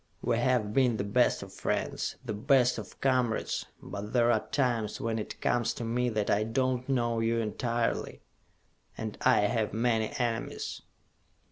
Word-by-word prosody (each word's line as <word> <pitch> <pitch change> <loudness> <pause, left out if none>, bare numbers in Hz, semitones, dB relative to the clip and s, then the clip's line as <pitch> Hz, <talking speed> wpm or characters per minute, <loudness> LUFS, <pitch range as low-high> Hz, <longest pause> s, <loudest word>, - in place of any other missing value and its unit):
"We 115 - +1
have 120 -4 +1
been 125 -3 +3
the 100 - -1
best 115 +5 +2
of - - -11
friends, - - -2
the 115 - -2
best 125 +3 +3
of - - -10
comrades; 125 -4 +1 0.2
but 100 +3 -6
there 120 -1 +4
are 110 - 0
times 120 -6 0
when 115 -1 -1
it 105 - -6
comes 120 -1 +1
to - - -5
me 120 +2 0
that 110 -3 0
I 105 - +3
do 130 +4 +1
not 125 +2 -13
know 120 -3 +1
you 115 +1 +1
entirely! 115 +1 -1 0.7
And 110 -2 -4
I - - +5
have 105 +1 0
many 115 -1 +1
enemies!" 115 -2 -2
115 Hz, 165 wpm, -30 LUFS, 110-125 Hz, 0.7 s, I